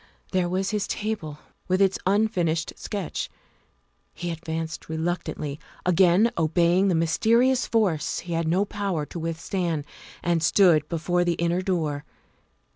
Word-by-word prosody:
There 185 -2 +1
was 190 +2 -1
his 210 -2 -1
table 205 -9 -3 0.3
with 185 +1 +2
its 195 -1 +3
unfinished 180 -6 +1
sketch; 200 -5 -4 0.9
he 175 - -4
ad 165 -1 -6
vanced 160 -1 -5
reluctantly, 160 -3 -3 0.3
again 180 +5 +4
obeying 170 +4 +3
the 185 - +2
mysterious 230 +10 +3
force 195 -10 +1
he 175 -1 -5
had 165 0 0
no 185 +5 +2
power 195 -7 -2
to 170 - -7
withstand, 165 -1 -2 0.4
and 170 -1 +1
stood 165 -4 +4
before 175 +2 0
the 175 -1 +1
inner 170 +2 0
door. 160 -6 -1
175 Hz, 135 wpm, -25 LUFS, 160-195 Hz, 0.9 s, again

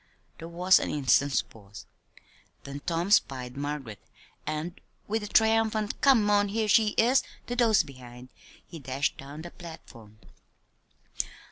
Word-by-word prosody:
There 165 - -7
was 180 +3 +4
an - - -3
instant's 140 -2 +2
pause; 105 -1 -14 0.8
then 140 0 -7
Tom 170 +3 -1
spied 130 - +2
Margaret, 140 -7 -5 0.5
and 155 +3 -4 0.3
with 220 +2 -1
a 210 - -5
triumphant 220 0 +2
"Come 255 -7 +5
on 205 0 +3
here 215 +2 -1
she 215 0 +3
is!" 250 +4 +4 0.2
to 245 - -4
those 230 -6 +4
behind, 125 -3 -12 0.4
he 165 - -10
dashed 135 0 -2
down 145 +3 -9
the 175 - -9
platform. 115 - -13
165 Hz, 135 wpm, -27 LUFS, 135-210 Hz, 0.8 s, Come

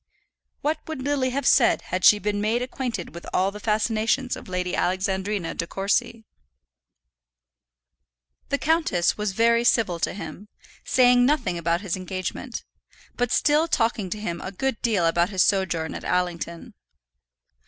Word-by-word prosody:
What 305 +1 0
would 315 -5 -5
Lily 275 -2 0
have 270 +1 -3
said 245 -2 +4
had 185 0 -1
she 210 - +8
been 205 0 -2
made 225 +4 +1
acquainted 250 -7 -4
with 170 - -9
all 190 +2 +1
the 210 - -9
fascinations 220 +4 0
of - - -11
Lady 180 0 -2
Alexandrina 190 0 -1
De 170 - -3
Courcy? 205 +4 -1 2.2
The 280 - +1
countess 300 - +1
was 210 -2 -2
very 230 +2 +3
civil 220 -7 +2
to - - -1
him, 205 0 -8 0.4
saying 245 -1 +4
nothing 245 -9 +1
about 170 +1 0
his 195 -5 -2
engagement, 185 +6 -5 0.5
but 245 -1 -1
still 300 +2 +3
talking 225 - 0
to 210 - -4
him 170 -5 -4
a 190 - -5
good 260 +4 -2
deal 210 -7 +1
about 170 +2 +2
his 190 -3 +3
sojourn 175 -5 0
at - - -7
Allington. 175 -2 -2
210 Hz, 150 wpm, -24 LUFS, 180-245 Hz, 2.2 s, she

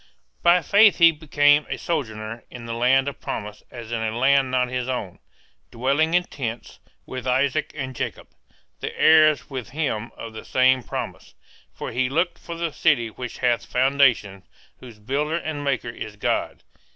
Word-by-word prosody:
By 175 0 +4
faith 205 +5 +5
he 170 -1 +7
became 145 -1 +3
a - - -3
sojourner 115 -8 -4
in 120 -2 -10
the 115 - -4
land 130 +3 +3
of 140 - -6
promise 105 0 -5
as 120 -2 -9
in 115 -1 -2
a 110 +1 -2
land 135 +1 +3
not 125 0 +1
his 125 0 -3
own, 105 -8 -4 0.5
dwelling 140 +7 +1
in 180 - +4
tents, 120 -8 -6 0.3
with 130 -1 -6
Isaac 135 +4 +1
and 130 -2 -5
Jacob, - - -5 0.5
the - - -6
heirs 155 -2 +5
with 130 -6 -6
him 125 -6 -2
of 115 -1 -8
the 110 - -8
same 130 0 +3
promise; - - -7 0.4
for - - -7
he 125 0 0
looked 170 +5 0
for 170 - -7
the 165 -1 -3
city 140 -9 +2
which 125 +1 -7
hath 120 -1 +2
foundations, 125 -7 +2 0.4
whose 120 -4 -12
builder 140 +9 -2
and 155 -3 -4
maker 135 -4 -1
is 110 -2 -8
God. 105 - -2
130 Hz, 170 wpm, -23 LUFS, 115-150 Hz, 0.5 s, he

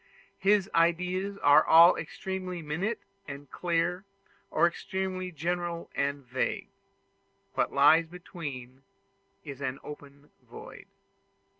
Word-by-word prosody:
His 195 0 +3
ideas 180 +4 +1
are 145 +2 +7
all 165 +2 +8
either - - -4
extremely 185 +1 -5
minute 180 +10 -2 0.3
and 140 0 -9
clear, 175 +1 -1 0.5
or - - +3
extremely 185 +1 -3
general 170 +1 -3
and 140 -1 -2
vague: 125 +2 -2 0.8
what - - 0
lies 155 +4 +5
between 140 -7 -8 0.6
is 140 -2 -9
an 135 -1 -3
open 145 -1 -12
void. - - -12
170 Hz, 110 wpm, -29 LUFS, 145-180 Hz, 0.8 s, all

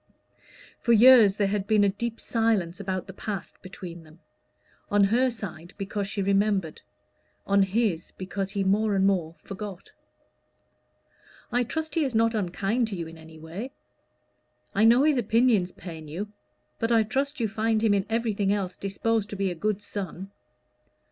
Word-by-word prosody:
For 235 - +2
years 230 -3 +8
there 205 -1 +1
had 200 -1 -2
been 215 -2 +4
a 200 - +4
deep 230 +3 -4
silence 215 -7 0
about 190 -2 -3
the 190 - -10
past 200 -1 -6
between 180 -2 -9
them; 160 +1 -18 0.7
on 205 0 +4
her 240 +6 +3
side 190 -7 -7
because 200 0 -3
she 200 0 -2
remembered; 195 -4 +1 0.6
on 200 0 +3
his, 195 -3 0
because 190 +1 -4
he 200 -1 -1
more 205 +2 +2
and 190 0 +3
more 175 -5 +1
forgot. 200 -2 -8 1.6
"I 245 +1 +2
trust 315 +6 -4
he 325 - +2
is 265 -5 -2
not 230 +1 +3
unkind 210 +4 0
to 210 - -4
you 170 -2 -4
in 165 +1 -10
any 160 0 -13
way. 175 - -7 1.0
I 210 +3 +3
know 240 +4 +6
his 300 -2 +3
opinions 225 -4 +2
pain 160 -4 -9
you; 185 +8 -5 0.5
but 230 - 0
I 225 -1 +5
trust 275 +6 -2
you 230 - +1
find 220 +1 0
him 220 -2 +4
in 195 -1 0
everything 220 -4 0
else 195 -3 -2
disposed 210 +2 -1
to 205 - -6
be 195 -1 -1
a - - -2
good 210 +4 -2
son." 195 -1 -6
200 Hz, 170 wpm, -26 LUFS, 190-225 Hz, 1.6 s, years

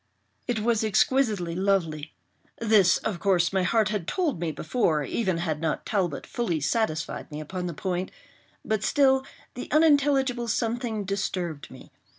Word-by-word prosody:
It 235 -3 -1
was 225 0 +1
exquisitely 215 -4 +1
lovely—this, 175 - 0
of 200 -6 -4
course, 180 -2 +2
my 190 - +2
heart 215 +3 +2
had 205 -6 -3
told 325 - -1
me 165 -2 -2
before, 155 - 0
even 190 +3 -1
had 160 -3 -2
not 160 -2 -2
Talbot 180 -8 -1
fully 180 -10 -2
satisfied 155 +1 -1
me 150 0 -6
upon 180 +4 -5
the 170 - -5
point—but 190 +4 -5
still 265 +2 +3 0.3
the 250 - -7
unintelligible 280 -5 +3
something 230 -1 -1
disturbed 185 -6 -3
me. 130 - -14
195 Hz, 140 wpm, -26 LUFS, 165-235 Hz, 0.3 s, still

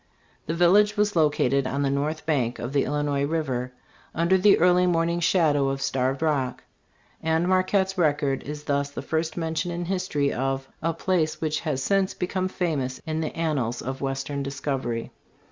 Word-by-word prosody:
This 165 - -2
village 205 +5 +4
was 210 -1 +1
located 140 -4 +2
on 140 +2 -1
the 135 - +1
north 150 +3 -2
bank 130 -7 0
of 120 +3 -5
the 140 - +2
Illinois 145 0 0
river, 135 -5 -2 0.4
under 170 +3 +3
the 195 +2 +5
early 180 +1 +4
morning 170 0 +1
shadow 155 -6 +3
of 135 0 -2
Starved 135 +2 -1
Rock; 135 -5 0 0.6
and 160 +2 +1
Marquette's 190 +1 +1
record 145 -4 +1
is 150 +1 -7
thus 140 -1 0
the 140 - -7
first 160 +1 -2
mention 165 +1 -2
in 175 0 -3
history 180 -6 -1
of 135 +1 -2
" - - -38
a 165 - +1
place 165 -2 0
which 155 -1 -1
has 140 -5 -2
since 195 +2 +1
become 185 +1 -1
famous 150 -9 -2
in 160 0 -2
the 155 - -4
annals 135 -8 -1
of 130 +1 -5
western 135 +1 -3
discovery." 135 -4 -3
155 Hz, 175 wpm, -25 LUFS, 135-175 Hz, 0.6 s, the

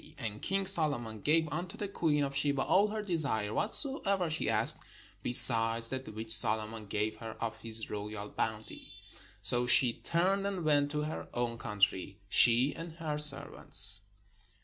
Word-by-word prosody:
And 110 -2 -7
king 195 0 -2
Solomon 120 - +2
gave 160 +5 +1
unto 170 +4 -7
the 205 - -5
queen 155 -6 -1
of 140 0 -5
Sheba 140 -1 0
all 200 +3 +2
her 215 0 -6
desire, 140 - -2
whatsoever 200 - 0
she 155 - -2
asked, - - +2 0.4
besides 115 -1 +4
that 130 -2 -7
which 110 0 -1
Solomon 110 0 +2
gave 105 +2 -3
her 115 -1 -9
of 115 -1 -5
his 110 -1 -3
royal 105 0 -7
bounty. 110 0 -6 0.5
So 120 +4 +7
she 125 -1 +4
turned 190 +7 -2
and 190 -5 -5
went 145 -2 +1
to 150 0 -4
her 155 +1 -7
own 120 -1 -3
country, 100 -4 -2
she 120 +7 +3
and 165 0 -9
her 155 -3 -6
servants. 105 -8 +3
130 Hz, 155 wpm, -30 LUFS, 110-160 Hz, 0.5 s, So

